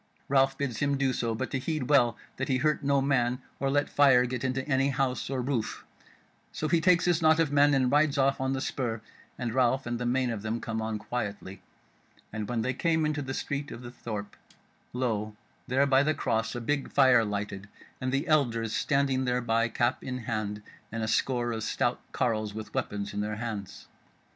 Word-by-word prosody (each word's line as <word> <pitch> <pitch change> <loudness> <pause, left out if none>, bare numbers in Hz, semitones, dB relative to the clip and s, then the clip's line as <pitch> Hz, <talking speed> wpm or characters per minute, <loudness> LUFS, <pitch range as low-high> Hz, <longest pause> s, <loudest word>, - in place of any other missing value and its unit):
Ralph 135 0 +3
bids 130 -6 -2
him 140 0 +1 0.2
so 115 -1 -1
do, - - -6
but 130 - -3
to 135 - -1
heed 150 -1 -2
well 130 -5 +4 0.2
that 135 - -2
he 130 - +2
hurt 150 +3 +1
no 140 -1 +2
man, 125 -2 +1 0.2
or 135 - 0
let 145 +1 +2
fire 135 -4 +5
get 125 0 -4
into 130 +1 -1
any 135 -1 +2
house 135 -2 -1
or 130 -2 -1
roof; 125 -4 -2 0.7
so 155 - -3
he 165 +2 +2
takes 180 0 +4
his 175 -2 +2
knot 160 0 +5
of 160 -3 +2
men 145 0 +5
and 130 -2 +2
rides 150 0 +3
off 135 0 +2
on 130 0 0
the 135 - -2
spur, 120 -5 -2 0.4
and 120 -3 -3
Ralph 130 +1 +2
and 120 -1 -3
the 120 - -1
main 125 0 +1
of 110 -3 -4
them 110 +2 -2
come 110 -1 -3
on 110 0 -2
quietly; 105 -4 -5 0.7
and 110 0 -4
when 115 -2 -1
they 130 - 0
came 160 +3 +1
into 150 -1 -1
the 130 -1 -4
street 145 0 -3
of 120 - -8
the 120 - -8
thorp, 105 -4 -6 0.6
lo 110 -4 -2 0.3
there 135 +2 +3
by 135 -1 +4
the 155 +2 +1
cross 115 +1 -1
a 120 - -3
big 140 +4 -1
fire 130 -4 +5
lighted, 100 -1 -4 0.3
and 130 0 -1
the 135 +5 -1
elders 115 -8 +1
standing 135 -2 +1
thereby 120 -2 +1
cap 120 +2 0
in 125 -1 -4
hand, 105 -2 -3 0.3
and 115 0 -3
a - - -1
score 120 +1 +1
of 110 -1 -3
stout - - -1
carles 110 -3 -1
with 110 -1 -7
weapons 100 0 -3
in 105 - -2
their 105 +1 -2
hands. 110 -3 -6
125 Hz, 205 wpm, -28 LUFS, 115-140 Hz, 0.7 s, fire